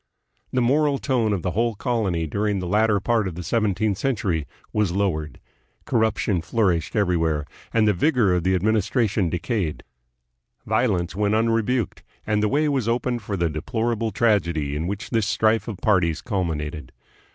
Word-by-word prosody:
The 125 - +1
moral 145 +3 +2
tone 125 -6 0
of 100 -4 -1
the 90 - -1
whole 115 +2 0
colony 100 -9 -1
during 100 +6 -1
the 90 - -3
latter 105 +3 +2
part 110 0 +1
of 90 - -5
the 90 - -6
seventeenth 105 +1 0
century 100 - -1 0.3
was 105 -4 +1
lowered. 85 -6 -1 0.5
Corruption 110 -5 +1
flourished 90 -3 0
everywhere, 80 -7 +1 0.3
and 110 -2 +3
the 105 - +4
vigor 115 - +2
of 90 -2 0
the 95 +1 +2
administra 110 +4 +1
tion 100 -4 0
decayed. 90 -2 -2 0.8
Violence 105 -7 0
went 105 +1 +1
unrebuked, 115 +1 0 0.2
and 105 -1 +1
the 105 - +2
way 150 +4 +2
was 135 -6 0
open 120 +1 0
for 105 -2 -4
the 85 -1 +1
deplorable 115 +8 -2
tragedy 85 -10 +1
in 80 +3 -2
which 100 +1 -5
this 115 -4 +1
strife 110 +3 +2
of 110 -5 -5
parties 90 -5 +2
culminated. 80 - -3
105 Hz, 165 wpm, -23 LUFS, 90-115 Hz, 0.8 s, the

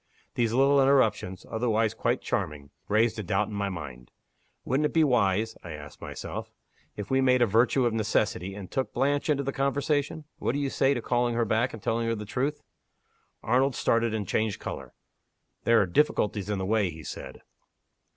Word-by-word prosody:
These 115 -2 +1
little 135 +3 +4
interruptions 115 -9 +2
otherwise 110 -1 0
quite - - -1
charming 70 -2 -3 0.2
raised 110 +2 +2
a - - -3
doubt 95 +3 0
in - - -7
my 100 -1 -1
mind. 70 -9 -8 0.6
Wouldn't 140 +4 +2
it - - -10
be 160 - +4
wise 110 -5 +2
(I 85 - -7
ask 75 -1 -11
myself), - - -6 0.5
if 105 +2 -6
we 135 0 +3
made 125 -1 +4
a - - +5
virtue 120 +4 +3
of 120 - +1
necessity, 105 -3 0
and 100 -3 -9
took 130 -1 -2
Blanche 140 +4 +1
into 140 -2 +2
the 140 0 -3
conversation? 145 +3 -1
What - - 0
do 140 - -1
you 140 -2 -1
say 135 +1 +2
to 120 - -4
calling 120 -1 +1
her 115 0 +1
back 115 +4 +1
and 110 - -10
telling 115 0 0
her 115 - 0
the 105 -1 -6
truth?" 135 +8 -2 0.8
Arnold 130 +3 +2
started, 115 0 +1
and 105 -3 -3
changed 110 0 0
color. 70 -2 -7 0.7
"There 115 -1 +5
are 100 - +3
difficulties 105 -2 +1
in 105 - 0
the 95 - -2
way," 105 -1 +2
he 80 -1 -9
said. - - -8
115 Hz, 190 wpm, -27 LUFS, 100-135 Hz, 0.8 s, a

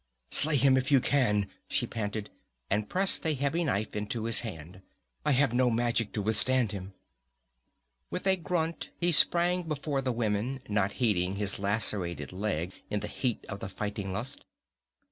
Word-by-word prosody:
"Slay 150 +1 +4
him 135 -1 +5
if 130 +2 0
you 135 - +7
can!" 105 -7 +2 0.2
she - - +1
panted, 105 -2 -4 0.4
and 105 +1 0
pressed 195 +1 +2
a 160 -3 +2
heavy 140 +5 0
knife 110 -8 -1
into 105 +2 -3
his 115 0 +3
hand. 95 -4 -7 0.4
"I - - +1
have 135 -2 +3
no 125 0 +3
magic 115 -1 0
to 105 - -2
withstand 115 +2 +2
him!" 95 -1 -7 1.2
With 180 - -4
a 190 -1 +5
grunt 165 -1 -2
he 175 0 +2
sprang 175 +3 +4
before 150 -3 -2
the 130 -1 0
women, 115 +3 -1
not 105 -3 +1
heeding 95 -6 +1
his 100 -1 -2
lacerated 100 -4 -1
leg 90 -3 -2 0.2
in 105 - -1
the - - -3
heat 125 -4 -2
of 100 - -6
the 95 - -5
fighting 100 0 -4
lust. 120 +8 -4
115 Hz, 165 wpm, -30 LUFS, 100-140 Hz, 1.2 s, you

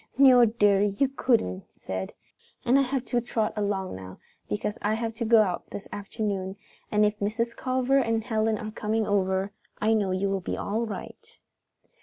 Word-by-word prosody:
"No, 255 -3 +8
dearie, 205 -2 +3
you 275 - +3
couldn't," 230 - +1
she - - -33
said. 95 0 -4 0.5
"And 260 +3 +5
I - - +5
have 270 -1 -1
got - - -24
to 240 -1 +2
trot 225 -2 -1
along 200 - -2
now 95 0 -9 0.3
because 105 - -2
I 210 +1 +1
have 225 0 -3
to 230 +1 -3
go 225 -1 +6
out 180 -4 -3
this 200 - -7
afternoon, 200 -2 -3 0.4
and 210 0 +4
if 210 0 0
Mrs. 230 +3 -1
Culver 260 +1 +1
and 225 -3 0
Helen 220 -1 0
are 215 +1 -6
coming 220 0 -1
over, 190 -1 +1 0.3
I 220 +1 +3
know 205 -3 +1
you 190 +1 0
will 195 -1 -1
be - - -3
all 225 +3 -2
right." 210 - -9
215 Hz, 190 wpm, -27 LUFS, 200-235 Hz, 0.5 s, No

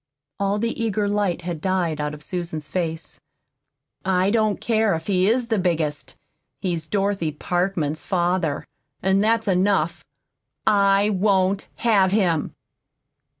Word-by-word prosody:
All 200 +1 +1
the 230 +1 -2
eager 210 -2 0
light 200 -4 0
had 170 -3 -4
died 175 -5 0
out 150 0 -3
of 150 - -13
Susan's 170 -4 -4
face. 165 -3 -4 0.8
"I 190 +1 +2
don't 215 -2 +1
care 220 -5 +2
if 160 - -6
he 190 -1 +2
is 240 +1 +1
the 220 -3 +1
biggest, 160 -5 -1 0.4
he's 170 -4 -2
Dorothy 195 -4 0
Parkman's 170 -1 -1
father, 175 -4 0 0.4
and 190 +2 +3
that's 225 0 +2
enough. 185 -3 +1 0.6
I 200 0 +4
WON'T 195 0 +1
HAVE 200 -5 +3
HIM!" 175 -7 +1
190 Hz, 130 wpm, -23 LUFS, 170-205 Hz, 0.8 s, I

